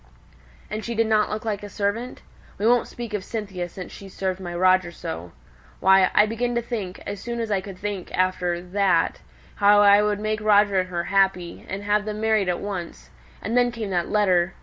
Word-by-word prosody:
"And 215 Hz, +1 st, -3 dB
she 235 Hz, -, -4 dB
didn't 220 Hz, -1 st, +2 dB
look 215 Hz, +1 st, -4 dB
like 210 Hz, -2 st, -2 dB
a 205 Hz, -, -8 dB
servant? 210 Hz, +5 st, -3 dB, 0.3 s
We 205 Hz, -, -2 dB
won't 240 Hz, +1 st, +4 dB
speak 235 Hz, -2 st, -7 dB
of 205 Hz, -3 st, -2 dB
Cynthia 195 Hz, -5 st, -5 dB
since 185 Hz, +1 st, -9 dB
she's 195 Hz, -1 st, -11 dB
served 190 Hz, -1 st, -2 dB
my 175 Hz, -2 st, -6 dB
Roger 185 Hz, 0 st, +3 dB
so. 85 Hz, -, -7 dB, 0.5 s
Why, 190 Hz, 0 st, +5 dB
I 210 Hz, -, +7 dB
began 240 Hz, +3 st, -2 dB
to 235 Hz, -, +1 dB
think, 210 Hz, -6 st, -5 dB
as 205 Hz, 0 st, -5 dB
soon 235 Hz, +4 st, -5 dB
as 225 Hz, -2 st, -3 dB
I 195 Hz, -2 st, +1 dB
could 190 Hz, -1 st, -9 dB
think 200 Hz, -2 st, -5 dB
after 180 Hz, -1 st, 0 dB
that, 180 Hz, -2 st, +1 dB, 0.4 s
how 205 Hz, 0 st, +6 dB
I 205 Hz, 0 st, +7 dB
would 210 Hz, -1 st, 0 dB
make 215 Hz, 0 st, -2 dB
Roger 205 Hz, -2 st, +4 dB
and 185 Hz, 0 st, -2 dB
her 170 Hz, -1 st, -2 dB
happy, 190 Hz, -3 st, 0 dB
and 195 Hz, +1 st, -4 dB
have 210 Hz, 0 st, +1 dB
them 215 Hz, 0 st, -4 dB
married 220 Hz, -3 st, +2 dB
at 175 Hz, -, 0 dB
once; 185 Hz, -4 st, -6 dB, 0.3 s
and 225 Hz, -, -2 dB
then 245 Hz, 0 st, +3 dB
came 220 Hz, -4 st, -5 dB
that 175 Hz, -2 st, -1 dB
letter! 185 Hz, -4 st, +2 dB
200 Hz, 205 wpm, -24 LUFS, 185-215 Hz, 0.5 s, I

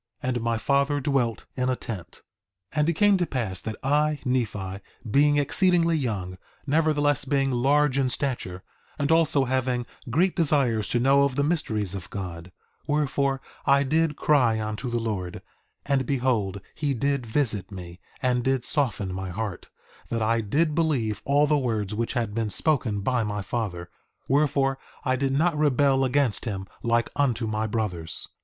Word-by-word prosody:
2:15 130 Hz, -, 0 dB
And 120 Hz, -2 st, -1 dB
my 115 Hz, 0 st, 0 dB
father 140 Hz, +4 st, +1 dB
dwelt 130 Hz, -5 st, 0 dB
in 125 Hz, 0 st, -1 dB
a 130 Hz, -, +1 dB
tent. 105 Hz, -8 st, -7 dB, 0.5 s
2:16 150 Hz, -, -1 dB
And 150 Hz, +2 st, +3 dB
it -, -, +2 dB
came 205 Hz, +4 st, +4 dB
to 175 Hz, -2 st, 0 dB
pass 110 Hz, -8 st, -3 dB
that 110 Hz, -1 st, -4 dB
I, 150 Hz, +2 st, +2 dB
Nephi, 105 Hz, -7 st, -1 dB, 0.3 s
being 145 Hz, +3 st, +4 dB
exceedingly 170 Hz, +3 st, +3 dB
young, 100 Hz, -, -3 dB, 0.3 s
nevertheless 145 Hz, -1 st, +2 dB
being 135 Hz, 0 st, +1 dB
large 140 Hz, +2 st, +2 dB
in 130 Hz, -2 st, +2 dB
stature, 120 Hz, -9 st, -3 dB, 0.3 s
and 145 Hz, +2 st, 0 dB
also 160 Hz, -4 st, +3 dB
having 125 Hz, -1 st, 0 dB, 0.2 s
great 175 Hz, +9 st, +2 dB
desires 135 Hz, -, +2 dB
to 120 Hz, -, 0 dB
know 135 Hz, +3 st, +4 dB
of 140 Hz, -2 st, 0 dB
the 145 Hz, -, +1 dB
mysteries 110 Hz, -, -1 dB
of 95 Hz, -2 st, -7 dB
God, 90 Hz, -3 st, -6 dB, 0.4 s
wherefore, 140 Hz, -2 st, 0 dB, 0.3 s
I 140 Hz, 0 st, +5 dB
did 155 Hz, +2 st, +1 dB
cry 125 Hz, -9 st, +3 dB
unto 110 Hz, +3 st, -3 dB
the 120 Hz, -, -1 dB
Lord; 105 Hz, -6 st, -3 dB, 0.4 s
and 140 Hz, -2 st, +1 dB
behold 120 Hz, -8 st, 0 dB
he 145 Hz, -3 st, -1 dB
did 140 Hz, 0 st, -1 dB
visit 110 Hz, -5 st, 0 dB
me, 90 Hz, -2 st, -9 dB, 0.2 s
and 125 Hz, -1 st, +2 dB
did 130 Hz, -1 st, +1 dB
soften 115 Hz, -10 st, 0 dB
my 95 Hz, 0 st, -4 dB
heart 100 Hz, 0 st, -5 dB, 0.4 s
that 115 Hz, -1 st, -1 dB
I 115 Hz, +1 st, +2 dB
did 150 Hz, +9 st, +1 dB
believe 140 Hz, -10 st, 0 dB
all 145 Hz, +1 st, +4 dB
the 150 Hz, 0 st, +2 dB
words 110 Hz, -6 st, -1 dB
which 115 Hz, +2 st, -2 dB
had 115 Hz, -5 st, -1 dB
been 110 Hz, -1 st, -1 dB
spoken 110 Hz, -, +1 dB
by 125 Hz, +3 st, +1 dB
my 105 Hz, -1 st, -3 dB
father; 90 Hz, -5 st, -4 dB, 0.4 s
wherefore, 135 Hz, -1 st, +2 dB, 0.3 s
I 130 Hz, -1 st, +2 dB
did 135 Hz, +1 st, 0 dB
not 160 Hz, +4 st, +2 dB
rebel 140 Hz, -2 st, +3 dB
against 130 Hz, -3 st, +1 dB
him 95 Hz, -4 st, -3 dB, 0.2 s
like 115 Hz, 0 st, +1 dB
unto 125 Hz, -5 st, +1 dB
my 110 Hz, 0 st, -1 dB
brothers. 105 Hz, -7 st, -3 dB
130 Hz, 170 wpm, -26 LUFS, 110-145 Hz, 0.5 s, I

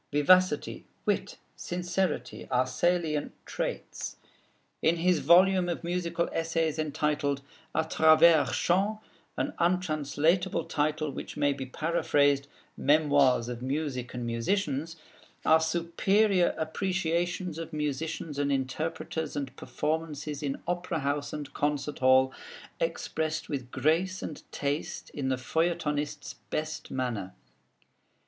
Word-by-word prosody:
Vivacity, 150 Hz, +2 st, +3 dB, 0.2 s
wit, -, -, -1 dB, 0.2 s
sincerity, 175 Hz, -1 st, -2 dB
are 130 Hz, 0 st, +2 dB
salient 155 Hz, +3 st, 0 dB
traits. -, -, -4 dB, 0.7 s
In 160 Hz, +2 st, +3 dB
his 175 Hz, 0 st, +2 dB
volume 185 Hz, +1 st, +5 dB
of 170 Hz, -, -3 dB
musical 170 Hz, 0 st, -1 dB
essays 165 Hz, -1 st, 0 dB
entitled 150 Hz, -2 st, 0 dB, 0.3 s
'A 160 Hz, -, +3 dB
Travers 160 Hz, 0 st, +6 dB
Chants' 200 Hz, +5 st, +1 dB, 0.4 s
(an -, -, -1 dB
untranslatable 170 Hz, 0 st, +1 dB
title 155 Hz, 0 st, 0 dB
which -, -, -7 dB
may 145 Hz, 0 st, +2 dB
be 135 Hz, -1 st, -6 dB
paraphrased 145 Hz, -2 st, +1 dB, 0.3 s
'Memoirs 145 Hz, -5 st, +3 dB
of 120 Hz, -1 st, -5 dB
Music 130 Hz, -2 st, -2 dB
and 120 Hz, -1 st, -3 dB
Musicians') 145 Hz, -, -1 dB, 0.5 s
are 160 Hz, 0 st, +6 dB
superior 175 Hz, +4 st, +2 dB
appreciations 175 Hz, 0 st, -1 dB
of 165 Hz, -, -6 dB
musicians 150 Hz, 0 st, -3 dB
and 140 Hz, 0 st, +1 dB
interpreters 160 Hz, +4 st, -2 dB
and 135 Hz, -2 st, -4 dB
performances 150 Hz, -1 st, -3 dB
in 140 Hz, -2 st, -3 dB
opera 175 Hz, -2 st, -1 dB
house 145 Hz, +1 st, -1 dB
and 150 Hz, -2 st, -6 dB
concert 145 Hz, 0 st, -1 dB
hall, 130 Hz, 0 st, +5 dB, 0.5 s
expressed 160 Hz, -, -2 dB
with 135 Hz, -5 st, -4 dB
grace 165 Hz, +8 st, +1 dB
and 150 Hz, -, -6 dB
taste 145 Hz, +2 st, -3 dB
in 135 Hz, -2 st, -2 dB
the 130 Hz, -, +2 dB
feuilletonist's 150 Hz, 0 st, -1 dB, 0.2 s
best 155 Hz, +1 st, -3 dB
manner. 115 Hz, -8 st, -3 dB
155 Hz, 110 wpm, -29 LUFS, 140-170 Hz, 0.7 s, Travers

